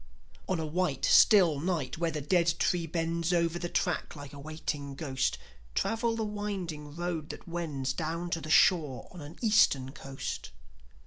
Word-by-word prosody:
On 185 -3 +1
a 160 - -2
white, 155 -3 0
still 180 -10 +6
night, 160 -5 -2
where 170 -1 +1
the 155 -2 -3
dead 170 +2 +2
tree 175 -2 +1
bends 165 +1 -1
Over 170 -1 +1
the 175 0 -3
track, 180 -3 -1
like 145 -1 -9
a 140 - -9
waiting 145 -2 -5
ghost, 135 -3 -1 0.4
Travel 230 0 0
the 225 - -1
winding 190 -8 -4
road 170 -3 -3
that - - -9
wends 150 -6 -2
Down 165 +3 -3
to 165 - -1
the 155 - -7
shore 155 -6 +4
on 180 - -10
an 145 +3 -9
Eastern 145 - +4
coast. 135 -2 -6
165 Hz, 170 wpm, -30 LUFS, 145-175 Hz, 0.4 s, still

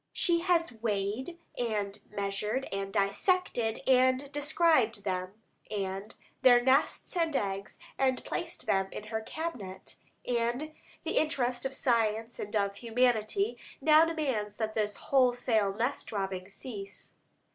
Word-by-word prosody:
She 345 -2 +3
has 340 -4 +2
weighed 220 - -2 0.2
and 210 -4 -2
measured, 210 +5 -2
and 195 0 -3
dissected, 225 - +1
and 260 +1 +3
described 290 - +2
them, 185 +1 -3 0.3
and 195 0 -4 0.3
their 245 -2 +7
nests, 265 +8 +2
and 330 -4 +1
eggs, 195 -2 -2 0.2
and 260 -1 +2
placed 340 0 -4
them 195 0 +2
in - - -6
her 220 +1 -3
cabinet; 220 - -6 0.3
and 245 +5 -1 0.3
the - - -1
interest 255 -5 0
of 265 - -9
science 230 -3 +1
and 205 +1 -5
of 200 -1 +1
humanity 245 - +1 0.2
now 310 0 +6
demands 265 -11 -1
that 220 -1 -2
this 210 -2 0
wholesale 245 -6 +2
nest 240 +7 -2
robbing 195 -3 -3
cease. 200 -2 -8
230 Hz, 125 wpm, -30 LUFS, 205-270 Hz, 0.3 s, their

